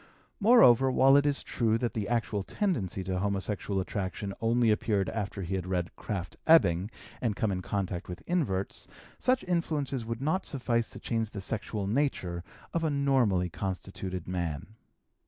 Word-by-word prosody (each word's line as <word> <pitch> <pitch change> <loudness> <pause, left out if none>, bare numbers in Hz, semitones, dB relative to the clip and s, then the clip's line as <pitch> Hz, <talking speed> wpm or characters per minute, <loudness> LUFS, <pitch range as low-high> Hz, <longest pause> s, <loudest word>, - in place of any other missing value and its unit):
Moreover, 165 - +6
while 135 +1 +6
it 145 +1 +5
is 140 -1 +2
true 115 -2 +1
that 120 0 -2
the 105 -3 -2
actual 110 -4 0
tendency 100 - -1
to 95 0 -2
homosexual 100 0 -1
attraction 100 +1 -3
only 115 0 +3
appeared 105 -2 +1
after 100 -2 -3
he 90 +2 -4
had 95 -1 -2
read 90 -2 -1
Krafft 95 -4 -5
Ebing 95 - +5 0.3
and 115 -4 0
come 110 0 0
in 90 -1 -2
contact 95 -2 -3
with 90 - -7
inverts, 125 - -1 0.3
such 255 0 +2
influences 150 -7 -1
would 115 +1 -4
not 155 +8 0
suffice 120 -4 0
to - - -8
change 115 -2 -1
the 105 - -7
sexual 105 0 -3
nature 100 -7 -1 0.3
of 170 - 0
a 160 - +2
normally 130 - +2
constituted 95 -1 -5
man. 85 0 -3
105 Hz, 160 wpm, -29 LUFS, 95-135 Hz, 0.3 s, Moreover